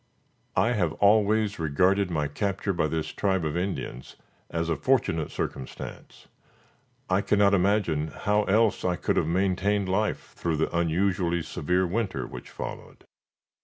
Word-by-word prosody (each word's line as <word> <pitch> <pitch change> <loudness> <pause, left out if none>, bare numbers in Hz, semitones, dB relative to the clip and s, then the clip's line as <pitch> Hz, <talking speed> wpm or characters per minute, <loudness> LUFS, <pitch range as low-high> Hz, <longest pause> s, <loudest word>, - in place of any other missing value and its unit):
I - - +3
have 90 -10 +1
always 105 0 +3
regarded 90 +6 +2
my 75 -4 0
capture 100 +6 -2
by 85 -3 +1
this 80 0 -2
tribe 95 -4 0
of 75 +1 -2
Indians 90 -8 -4 0.3
as 85 0 -2
a 85 - +1
fortunate 125 - +1
circumstance. 65 - -7 0.8
I 95 +2 +2
cannot 105 -1 +3
imagine 95 -5 +2
how 105 +7 0
else 110 +1 +2
I 90 -1 +1
could - - -1
have - - +2
maintained 95 +3 +1
life 105 +3 -1
through 80 -2 -1
the 80 +2 -1
unusually 85 0 +1
severe 90 +5 0
winter 95 - -2
which - - -9
followed. - - -8
95 Hz, 140 wpm, -27 LUFS, 80-100 Hz, 0.8 s, I